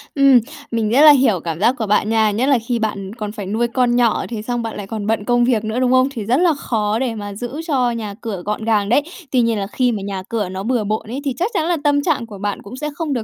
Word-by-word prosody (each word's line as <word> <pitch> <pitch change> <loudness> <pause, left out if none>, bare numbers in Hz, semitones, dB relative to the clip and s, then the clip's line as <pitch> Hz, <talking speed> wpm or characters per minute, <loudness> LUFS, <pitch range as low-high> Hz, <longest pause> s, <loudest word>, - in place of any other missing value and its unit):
Ừm, 275 -3 +6 0.3
mình 225 -2 0
nghĩa 255 +5 +4
là 305 0 +10
hiểu 255 - +3
cảm 165 0 -5
giác 235 +6 +3
của 225 - -2
bạn 210 +1 +2
nha, 220 -1 +3
nhất 225 +5 0
là 275 - +5
khi 240 -2 0
bạn 205 -3 -3
còn 210 -3 -5
phải 210 -2 -7
nuôi 220 +5 0
con 240 0 +1
nhỏ 240 -2 +2
thế 225 -3 -4
xong 240 +2 -2
bạn 225 -1 -5
lại 200 - -6
còn 210 -1 -4
bận 220 -2 0
công 240 +1 +3
việc 235 -3 +1
nữa, 220 +3 -2
đúng 255 -1 +2
không? 255 0 +4
Thì 235 -6 -5
rất 240 +5 +2
là 345 0 +3
khó 220 -6 -1
để 245 -3 -1
mà 205 -1 -6
giữ 245 +8 -5
cho 255 -6 +1
nhà 220 -3 -4
cửa 215 -6 -4
gọn 210 +1 -3
gàng 210 -3 +1
đấy. 250 +6 +4 0.3
Tuy 255 - +3
nhiên 230 -2 +1
là 195 - -3
khi 250 +4 +1
mà 215 -3 -3
nhà 195 -1 -4
cửa 215 -5 -2
nó 190 +1 -5
bừa 240 0 0
bộn 215 +1 -2
ấy, 260 +4 -4
thì 275 - 0
chắc 375 +7 -1
chắn 315 - 0
là 345 0 +1
tâm 290 -1 +3
trạng 295 -8 0
của 215 -3 -10
bạn 205 +1 -3
cũng 205 +6 -10
sẽ 300 +2 -3
không 310 -2 -2
được 240 -4 -2
230 Hz, 300 wpm, -19 LUFS, 210-255 Hz, 0.3 s, là